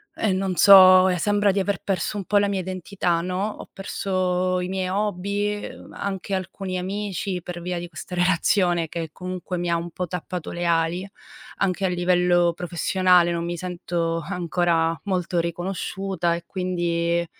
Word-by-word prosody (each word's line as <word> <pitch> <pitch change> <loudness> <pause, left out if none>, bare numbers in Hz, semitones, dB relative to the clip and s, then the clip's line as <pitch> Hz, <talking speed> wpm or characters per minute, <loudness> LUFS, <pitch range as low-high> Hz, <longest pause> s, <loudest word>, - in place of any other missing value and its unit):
ehm, 205 -11 0
non 190 -1 -1
so, 185 -1 +8
sembra 205 +2 +2
di 195 - 0
aver 195 -1 -1
perso 195 +2 -1
un 195 - -4
po' 205 - +2
la 205 - +3
mia 195 -1 -1
identità, 185 -1 -2
no, 185 +3 -2
ho - - -10
perso 185 -2 -1
i 180 - -2
miei 190 -1 -2
hobby, 205 +1 -1
uhm, - - -13
anche 195 0 -4
alcuni 185 0 -4
amici, 190 -1 -3
per 175 -1 -6
via 180 +1 -3
di 175 - -6
questa 180 - -8
relazione 175 -1 +2
che 165 0 -5
comunque 180 +1 -5
mi 175 0 -2
ha 170 - +2
un 170 +1 -5
po' 180 +2 -4
tappato 180 0 -5
le 175 0 -3
ali. 170 +2 +1 0.5
Anche 195 0 0
a - - +3
livello 175 -1 +2
professionale, 180 +1 +2
non 170 0 -2
mi 175 0 -3
sento 170 -1 -2
ancora 170 -2 0
molto 180 -2 -1
riconosciuta 175 +1 -2
e 170 0 -6
quindi 170 -2 -1
180 Hz, 165 wpm, -24 LUFS, 175-190 Hz, 0.5 s, so